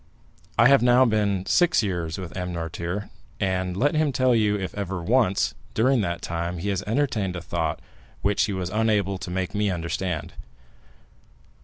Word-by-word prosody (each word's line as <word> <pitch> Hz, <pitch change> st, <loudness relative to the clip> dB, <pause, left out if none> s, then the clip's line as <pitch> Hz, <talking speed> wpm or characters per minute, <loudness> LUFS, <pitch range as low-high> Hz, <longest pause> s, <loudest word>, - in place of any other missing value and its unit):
I 120 Hz, 0 st, +7 dB
have 140 Hz, 0 st, +6 dB
now 125 Hz, +1 st, +5 dB
been 100 Hz, -4 st, +1 dB
six 175 Hz, -9 st, +3 dB
years 85 Hz, -5 st, -2 dB
with 90 Hz, -2 st, -7 dB
M. 90 Hz, -1 st, -3 dB
Noirtier, 85 Hz, +4 st, -4 dB, 0.3 s
and 95 Hz, -1 st, -1 dB
let 145 Hz, +8 st, +2 dB
him 155 Hz, -2 st, +2 dB
tell 130 Hz, 0 st, +2 dB
you 105 Hz, -3 st, +2 dB
if 95 Hz, -2 st, -4 dB
ever 95 Hz, -3 st, -4 dB
once, 110 Hz, -1 st, +2 dB, 0.2 s
during 125 Hz, +2 st, +3 dB
that 85 Hz, -3 st, -3 dB
time, 85 Hz, +1 st, -3 dB
he 95 Hz, +5 st, -3 dB
has 95 Hz, -2 st, -1 dB
entertained 110 Hz, -6 st, 0 dB
a -, -, -3 dB
thought 80 Hz, -2 st, -2 dB, 0.4 s
which 100 Hz, 0 st, +2 dB
he 105 Hz, -, -3 dB
was 90 Hz, -1 st, -3 dB
unable 105 Hz, -3 st, +1 dB
to -, -, -6 dB
make 90 Hz, 0 st, -2 dB
me 105 Hz, -1 st, +1 dB
understand." 90 Hz, -1 st, -3 dB
95 Hz, 170 wpm, -25 LUFS, 90-110 Hz, 0.4 s, I